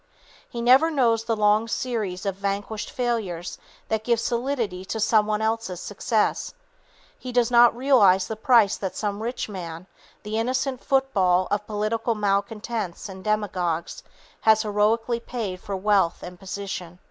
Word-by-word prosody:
He 235 Hz, -1 st, -5 dB
never 260 Hz, +7 st, +6 dB
knows 235 Hz, -7 st, +2 dB
the 230 Hz, -1 st, 0 dB
long 210 Hz, +1 st, +3 dB
series 215 Hz, -6 st, -3 dB
of 195 Hz, -, 0 dB
vanquished 200 Hz, +2 st, -3 dB
failures 215 Hz, -9 st, -3 dB, 0.3 s
that 220 Hz, -1 st, -1 dB
give 235 Hz, 0 st, +1 dB
solidity 235 Hz, -6 st, -2 dB
to 220 Hz, -, -4 dB
some 215 Hz, 0 st, +3 dB
one 215 Hz, 0 st, 0 dB
else's 220 Hz, -5 st, -2 dB
success; 215 Hz, -, -1 dB, 0.6 s
he 255 Hz, -, -6 dB
does 245 Hz, -1 st, +2 dB
not 240 Hz, -1 st, +6 dB
realize 210 Hz, -8 st, +4 dB
the 220 Hz, -, -4 dB
price 220 Hz, -2 st, +4 dB
that 190 Hz, -2 st, -4 dB
some 205 Hz, -1 st, -3 dB
rich 240 Hz, +3 st, -3 dB
man, 175 Hz, -4 st, -7 dB, 0.4 s
the 215 Hz, +1 st, -2 dB
innocent 255 Hz, +2 st, -1 dB
football 195 Hz, -10 st, +2 dB
of 210 Hz, 0 st, -1 dB
political 220 Hz, +2 st, -1 dB
malcontents 205 Hz, -1 st, -2 dB
and 190 Hz, -1 st, -9 dB
demagogues, 185 Hz, -6 st, -1 dB, 0.4 s
has 220 Hz, 0 st, +4 dB
heroicly 225 Hz, +3 st, +1 dB
paid 205 Hz, -7 st, -4 dB
for 200 Hz, -, -4 dB
wealth 195 Hz, -3 st, +1 dB
and 180 Hz, 0 st, -9 dB
position. 190 Hz, -3 st, -6 dB
215 Hz, 145 wpm, -24 LUFS, 195-235 Hz, 0.6 s, never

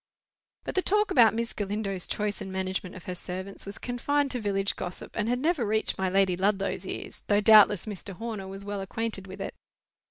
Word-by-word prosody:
But -, -, -4 dB
the 375 Hz, -, +3 dB
talk 420 Hz, +3 st, +2 dB
about 230 Hz, -4 st, +6 dB
Miss 235 Hz, 0 st, -1 dB
Galindo's 200 Hz, -2 st, -2 dB
choice 210 Hz, -1 st, -2 dB
and 190 Hz, -, -5 dB
management 190 Hz, 0 st, -3 dB
of 185 Hz, -, -10 dB
her 180 Hz, -, -4 dB
servants 185 Hz, +3 st, -6 dB
was 200 Hz, -, -6 dB
confined 275 Hz, +3 st, 0 dB
to 250 Hz, -, -1 dB
village 200 Hz, -2 st, 0 dB
gossip, 180 Hz, -, -6 dB
and 220 Hz, 0 st, 0 dB
had 245 Hz, -, +2 dB
never 305 Hz, 0 st, +1 dB
reached 220 Hz, -1 st, 0 dB
my 190 Hz, -1 st, +1 dB
Lady 190 Hz, -1 st, +3 dB
Ludlow's 195 Hz, 0 st, 0 dB
ears, -, -, -6 dB
though 205 Hz, 0 st, +4 dB
doubtless 210 Hz, -2 st, +7 dB
Mr. 200 Hz, -2 st, -6 dB
Horner 220 Hz, -2 st, -5 dB
was 195 Hz, +1 st, -7 dB
well 205 Hz, -1 st, -3 dB
acquainted 205 Hz, 0 st, -3 dB
with 190 Hz, +1 st, -9 dB
it. 195 Hz, -, -4 dB
205 Hz, 200 wpm, -28 LUFS, 190-225 Hz, -, doubtless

